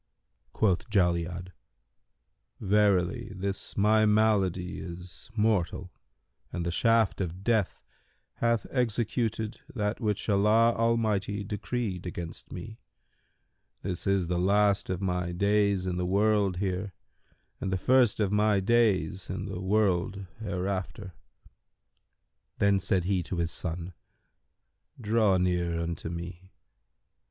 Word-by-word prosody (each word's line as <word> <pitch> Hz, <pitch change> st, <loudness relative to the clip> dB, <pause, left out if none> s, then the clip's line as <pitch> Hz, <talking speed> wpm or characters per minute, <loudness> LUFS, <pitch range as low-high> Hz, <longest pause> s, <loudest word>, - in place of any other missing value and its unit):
Quoth 110 Hz, +2 st, +1 dB
Jali'ad, 90 Hz, -2 st, 0 dB, 1.1 s
"Verily, 105 Hz, +2 st, +2 dB
this 95 Hz, +1 st, -4 dB
my 110 Hz, +2 st, +4 dB
malady 105 Hz, -4 st, +2 dB
is 90 Hz, +3 st, -9 dB
mortal 100 Hz, -4 st, 0 dB, 0.6 s
and 85 Hz, -1 st, -3 dB
the 85 Hz, -, -1 dB
shaft 115 Hz, +2 st, +2 dB
of 90 Hz, +1 st, -4 dB
death 110 Hz, -3 st, 0 dB, 0.5 s
hath 115 Hz, -2 st, +1 dB
executed 115 Hz, -2 st, -1 dB
that 105 Hz, -3 st, -2 dB
which 105 Hz, -3 st, -1 dB
Allah 110 Hz, +3 st, +4 dB
Almighty 110 Hz, -3 st, 0 dB
decreed 105 Hz, -2 st, -3 dB
against 85 Hz, -1 st, -7 dB
me: 110 Hz, +6 st, -8 dB, 1.0 s
this 90 Hz, -1 st, -3 dB
is 100 Hz, -2 st, +2 dB
the 90 Hz, +1 st, -1 dB
last 100 Hz, +2 st, +2 dB
of 95 Hz, +1 st, -2 dB
my 90 Hz, -2 st, -1 dB
days 100 Hz, +1 st, +2 dB
in 90 Hz, -1 st, -2 dB
the 90 Hz, 0 st, -1 dB
world 100 Hz, -1 st, +2 dB
here 95 Hz, +1 st, -2 dB, 0.7 s
and 95 Hz, -, -3 dB
the 95 Hz, -, +1 dB
first 125 Hz, +2 st, +3 dB
of 100 Hz, -2 st, +1 dB
my 105 Hz, -1 st, +3 dB
days 95 Hz, -5 st, +1 dB
in 95 Hz, +1 st, -4 dB
the 95 Hz, -3 st, -5 dB
world 95 Hz, -1 st, +1 dB
hereafter." 95 Hz, -1 st, -4 dB, 1.4 s
Then 100 Hz, -1 st, +3 dB
said 95 Hz, -1 st, 0 dB
he 95 Hz, 0 st, +1 dB
to 90 Hz, -, -5 dB
his 85 Hz, 0 st, 0 dB
son, 85 Hz, +1 st, -4 dB, 1.1 s
"Draw 105 Hz, -3 st, +2 dB
near 90 Hz, -2 st, 0 dB
unto 85 Hz, -1 st, -4 dB
me." 85 Hz, +2 st, -7 dB
100 Hz, 115 wpm, -28 LUFS, 90-110 Hz, 1.4 s, my